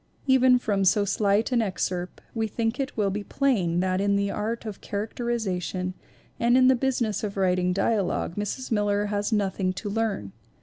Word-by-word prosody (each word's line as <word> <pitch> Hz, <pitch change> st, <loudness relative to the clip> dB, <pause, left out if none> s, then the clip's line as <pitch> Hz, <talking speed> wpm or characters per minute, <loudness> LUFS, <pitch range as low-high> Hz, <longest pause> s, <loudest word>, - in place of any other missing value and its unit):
Even 260 Hz, -2 st, +5 dB
from 205 Hz, -5 st, 0 dB
so 200 Hz, +2 st, +3 dB
slight 205 Hz, +3 st, +1 dB
an 240 Hz, -2 st, +3 dB
excerpt 185 Hz, -3 st, -3 dB
we 225 Hz, -1 st, -1 dB
think 225 Hz, +3 st, -2 dB
it 275 Hz, -2 st, -3 dB
will 200 Hz, -2 st, +1 dB
be 205 Hz, +1 st, -3 dB
plain 195 Hz, -11 st, +1 dB
that 185 Hz, 0 st, 0 dB
in 200 Hz, 0 st, +2 dB
the 200 Hz, 0 st, 0 dB
art 225 Hz, +3 st, -3 dB
of 215 Hz, -3 st, -6 dB
characterization 200 Hz, -4 st, -3 dB, 0.5 s
and 240 Hz, +2 st, +4 dB
in 255 Hz, 0 st, +6 dB
the 260 Hz, -, +6 dB
business 240 Hz, -5 st, -1 dB
of 205 Hz, -1 st, -4 dB
writing 180 Hz, -1 st, +2 dB
dialogue 195 Hz, -2 st, 0 dB
Mrs. 210 Hz, +6 st, -4 dB
Miller 205 Hz, -1 st, +1 dB
has 205 Hz, +2 st, -1 dB
nothing 195 Hz, -3 st, 0 dB
to 205 Hz, +2 st, -5 dB
learn. 210 Hz, -, -2 dB
205 Hz, 175 wpm, -26 LUFS, 195-230 Hz, 0.5 s, in